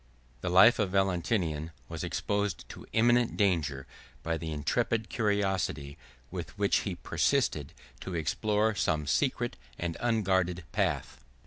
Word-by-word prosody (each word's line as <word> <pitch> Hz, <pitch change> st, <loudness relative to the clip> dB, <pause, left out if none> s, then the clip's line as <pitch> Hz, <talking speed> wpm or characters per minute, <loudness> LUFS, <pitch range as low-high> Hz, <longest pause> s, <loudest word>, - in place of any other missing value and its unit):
The -, -, -2 dB
life 100 Hz, +7 st, +7 dB
of 105 Hz, -3 st, +1 dB
Valentinian 90 Hz, -4 st, 0 dB, 0.2 s
was -, -, -5 dB
exposed 100 Hz, -3 st, -2 dB
to -, -, -10 dB
imminent 120 Hz, +1 st, +3 dB
danger 80 Hz, -10 st, +1 dB, 0.4 s
by 80 Hz, 0 st, 0 dB
the 80 Hz, 0 st, -4 dB
intrepid 110 Hz, +9 st, 0 dB
curiosity 95 Hz, -9 st, 0 dB, 0.4 s
with 85 Hz, +1 st, -6 dB
which 100 Hz, 0 st, +3 dB
he 95 Hz, -4 st, -2 dB
persisted 75 Hz, -3 st, 0 dB, 0.3 s
to 95 Hz, -, -5 dB
explore 105 Hz, +6 st, +1 dB
some 75 Hz, -6 st, 0 dB
secret 70 Hz, -, 0 dB, 0.2 s
and 85 Hz, -1 st, -3 dB
unguarded 95 Hz, -6 st, +1 dB
path. -, -, -1 dB
95 Hz, 125 wpm, -30 LUFS, 80-105 Hz, 0.4 s, life